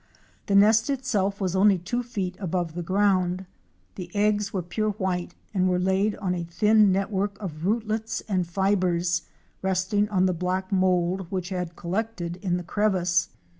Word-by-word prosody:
The 200 - +2
nest 215 +5 +5
itself 205 -7 0
was 190 -2 -1
only 195 0 +5
two 190 +8 -2
feet 200 -7 -4
above 175 -3 -2
the 175 - -4
ground. 185 0 +1 0.5
The 180 -2 -7
eggs 210 0 +1
were 185 -3 -2
pure 215 +5 -1
white 190 -3 -3 0.2
and 185 -2 +2
were 180 - +2
laid 190 +3 +1
ona 180 -4 -2
thin 210 +5 +4
net 195 +2 0
work 200 0 -1
of 170 -4 -5
rootlets 220 +1 -1
and 185 -4 0
fibres 180 -2 +1 0.4
resting 190 +2 +1
on 190 -3 +2
the 185 - +2
black 185 +2 -2
mould 185 -1 +1
which 185 -1 -3
had 180 -3 -4
collected 180 -1 -3
in 180 -2 -1
the 180 - -5
crevice. 180 -2 +1
190 Hz, 165 wpm, -25 LUFS, 180-205 Hz, 0.5 s, nest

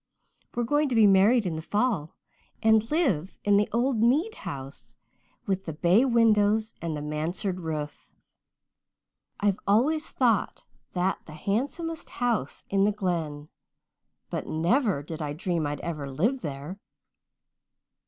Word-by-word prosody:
We're 240 - 0
going 290 +4 +1
to 250 - -1
be 225 -2 +6
married 205 +4 +5
in 170 -3 -2
the - - -4
fall 205 -4 -1 0.5
and 220 0 +4
live 235 - 0
in 205 0 +4
the 205 - +2
old 240 0 +1
Mead 295 - +3
house 135 - -8 0.5
with 190 -1 -1
the 160 - -4
bay 175 - +4
windows 220 -3 +3
and 165 -2 -3
the 145 - -5
mansard 165 +5 -2
roof. 155 -3 -5 1.3
I've 205 -1 +1
always 285 +10 +2
thought 235 -6 +1 0.3
that 185 +1 0
the 155 - -10
handsomest 275 - -3
house 235 - -2
in 195 0 +2
the 210 - +3
Glen, 165 -7 -3 0.8
but - - -3
never 180 - +1
did 160 +2 -7
I 145 -1 -3
dream 165 -1 -1
I'd 145 0 -4
ever 150 -5 -4
live 220 - 0
there. 145 +5 -6
200 Hz, 140 wpm, -27 LUFS, 160-235 Hz, 1.3 s, be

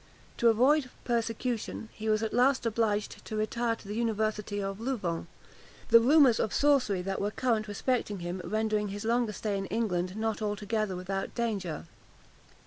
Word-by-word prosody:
To 235 - +3
avoid 255 +5 +3
persecution, 230 -1 -2
he 220 0 -4
was 215 0 +2
at 220 - -2
last 255 +2 +3
obliged 215 -2 -1
to 215 - -6
retire 230 +2 0
to 220 - -15
the 205 - -4
university 215 -2 -1
of 195 0 -3
Louvain; 200 -10 -2 0.6
the 230 - +9
rumours 265 0 +5
of - - 0
sorcery 255 -10 +3
that 195 +1 -2
were 205 - +1
current 225 -1 0
respecting 210 0 -1
him 175 +2 -4
rendering 215 +2 0
his 205 +2 -5
longer 235 -1 +1
stay 205 +1 -2
in 195 - -4
England 190 -4 -1
not 220 0 -1
altogether 210 -1 -1
without 195 +2 -4
danger. 200 - -2
215 Hz, 160 wpm, -29 LUFS, 205-235 Hz, 0.6 s, the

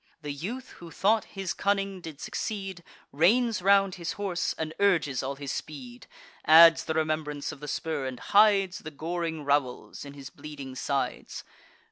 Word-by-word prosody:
The 145 -1 -4
youth, 215 - -6
who 170 - -10
thought 205 +6 +2
his 195 -2 -4
cunning 195 -1 -1
did 160 -4 -9
succeed, 195 -4 -5 0.3
Reins 220 - +3
round 195 0 +4
his 170 0 -2
horse, 195 -3 -2
and 160 0 -4
urges 170 -10 +2
all 135 +1 -3
his 140 -1 -5
speed; 130 -6 -7 0.4
Adds 165 +1 +8
the 160 - -2
remembrance 155 -2 -1
of - - -11
the 150 - -8
spur, 145 -2 -2
and 130 -2 -6
hides 200 -3 +4
The 155 - -8
goring 160 0 -4
rowels 140 -3 -1
in 140 -1 -9
his 140 -2 -10
bleeding 140 -3 -9
sides. 135 +1 -3
160 Hz, 160 wpm, -28 LUFS, 145-195 Hz, 0.4 s, Adds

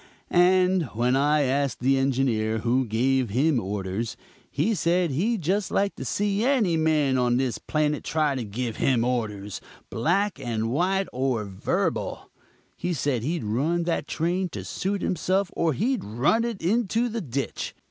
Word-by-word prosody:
And 180 0 +4
when 125 +3 +2
I 145 +2 +3
asked 140 +1 0
the 135 +2 +2
engineer 125 -5 +1
who 125 +3 +1
gave 125 +2 +1
him 135 +5 +2
orders, 100 +2 -3 0.3
he 225 - 0
said 170 -2 +1
he'd 195 - 0
just 195 +5 0
like 200 0 0
to - - -5
see 205 +1 0
any 240 -10 +2
man 155 -5 +2
on 120 -1 +2
this 130 -3 -1
planet 150 -1 -1
try 155 -3 +1
to 130 -3 -3
give 115 +2 -4
him 125 -4 +2
orders, 105 -5 -2 0.3
black 185 - 0
and 115 -1 -2
white 190 +7 +1
or 125 -4 0
verbal; 95 -1 -2 0.4
he 175 0 -2
said 135 -4 0
he'd 160 +5 -2
run 145 +11 0
that 170 0 -1
train 175 +3 -1
to - - -7
suit 195 +1 -2
himself 185 +2 0
or 165 -2 +1
he'd 235 - 0
run 135 - +1
it 230 -7 -4
into 225 +4 +1
the 230 -1 -3
ditch. 140 -2 -4
145 Hz, 160 wpm, -25 LUFS, 120-185 Hz, 0.4 s, And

